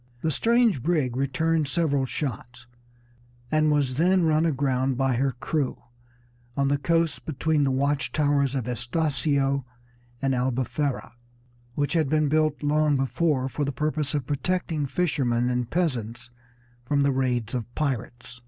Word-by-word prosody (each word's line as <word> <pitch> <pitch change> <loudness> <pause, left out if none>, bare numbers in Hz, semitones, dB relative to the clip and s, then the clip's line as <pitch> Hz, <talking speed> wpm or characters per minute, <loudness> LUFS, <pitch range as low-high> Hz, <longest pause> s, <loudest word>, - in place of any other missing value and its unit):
The 160 - 0
strange 230 - +3
brig 150 -6 0
returned 150 +4 0
several 140 -4 0
shots, 120 -3 -5 0.9
and 155 0 +3
was 145 -3 +1
then 185 +1 +4
run 160 0 +3
aground 135 -3 0
by 135 -1 +1
her 135 +1 +1
crew 135 +3 -2 0.8
on 140 0 +2
the 140 0 +1
coast 165 0 0
between 155 0 0
the - - +2
watch 140 +1 0
towers 145 -2 +1
of 130 -4 -2
Estacio 135 +2 0 0.6
and 135 0 0
Albufera, 130 +2 -1 0.6
which 145 +2 0
had 160 -5 +1
been 155 -1 +2
built 155 0 +1
long 150 0 +2
before 135 0 0
for 145 +2 -3
the 140 - -1
purpose 150 +2 -1
of 140 -4 -1
protecting 155 0 -1
fishermen 125 -7 0
and 125 -1 -1
peasants 120 -9 -2 0.5
from 140 +3 +1
the 140 - +3
raids 125 -4 -1
of 120 -3 -2
pirates. 125 -3 -3
140 Hz, 145 wpm, -25 LUFS, 130-155 Hz, 0.9 s, then